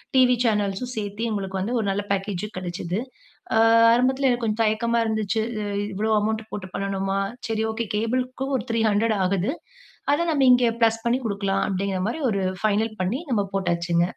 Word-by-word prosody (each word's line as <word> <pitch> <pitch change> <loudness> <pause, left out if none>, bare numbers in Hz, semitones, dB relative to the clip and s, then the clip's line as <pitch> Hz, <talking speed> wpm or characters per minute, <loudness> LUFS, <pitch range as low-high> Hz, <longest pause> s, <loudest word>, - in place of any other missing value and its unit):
TV 250 -1 +6
சேனல்ஸும் 210 +3 0
சேர்த்தி, 205 +1 -4
உங்களுக்கு 195 -2 -3
வந்து 230 +6 -2
ஒரு 215 - -1
நல்ல 200 +1 -1
பேக்கேஜு 200 0 -2
கெடைச்சது. 180 +1 -3 0.6
ஆ - - +4 0.4
ஆரம்பத்தில 260 +3 +2
எனக்கு 240 -1 0
கொஞ்சம் 220 +1 0
தயக்கமா 230 +2 +1
இருந்துச்சு. 220 0 0 0.5
இவ்வளோ 215 +3 0
அமௌண்ட் 220 +1 -1
போட்டு 195 -2 -5
பண்ணணுமா? 195 0 -1 0.3
சரி 220 0 -1
ஓகே. 230 +1 -3
கேபிளுக்கும் 255 +4 -1
ஒரு 210 - -4
300 220 -1 +2
ஆகுது. 195 +5 +1 0.6
அத 315 - +1
நம்ம 280 -3 +2
இங்க 245 -1 +5 0.2
பிளஸ் 225 0 +3
பண்ணிக் 245 +2 +1
குடுக்கலாம்." 200 -2 0
அப்படீங்கிறமாரி 195 +7 -1
ஒரு 200 -2 0 0.2
ஃபைனல் 215 +1 +2
பண்ணி, 210 +10 -1
நம்ம 210 -4 +2
போட்டாச்சுங்க. 175 -2 +1
215 Hz, 155 wpm, -24 LUFS, 195-235 Hz, 0.6 s, TV